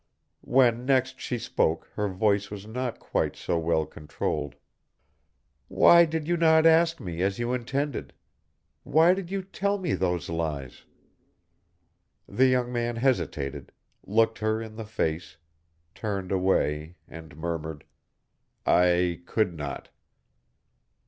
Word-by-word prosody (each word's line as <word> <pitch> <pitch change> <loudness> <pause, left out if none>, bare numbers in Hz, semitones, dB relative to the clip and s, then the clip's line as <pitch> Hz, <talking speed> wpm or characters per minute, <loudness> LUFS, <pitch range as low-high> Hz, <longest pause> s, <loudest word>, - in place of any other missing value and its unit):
When 125 -1 +3
next 130 -1 +1
she 125 - -3
spoke 80 -7 0
her 105 -1 -1
voice 100 +1 +1
was 105 -1 -8
not 120 +2 -4
quite - - -2
so 85 - -1
well 80 -1 +1
controlled. 75 -1 -4 1.1
"Why 170 - +6
did 160 -1 -3
you 175 0 +1
not 160 -1 +5
ask 165 +1 +4
me, 90 -6 -5
as 95 +1 0
you 120 +1 -1
intended? 135 +3 -3 0.7
Why 160 +4 +4
did 190 -2 -5
you 195 0 -3
tell 200 +1 -1
me 180 -5 -2
these 90 -4 -1
lies?" 80 -6 -4 1.4
The 130 +1 +3
young 125 -1 +1
man 120 0 -1
hesitated, 115 - -1 0.3
looked 115 +2 +1
her 110 0 0
in 110 -1 -8
the 110 0 -6
face, 80 -6 -3 0.6
turned 100 -4 -4
away, 90 -4 0
and 80 -1 -12
murmured, 80 -2 -4 0.8
"I 90 -1 +3
could 105 -6 0
not." 75 -3 -6
110 Hz, 125 wpm, -27 LUFS, 85-130 Hz, 1.4 s, Why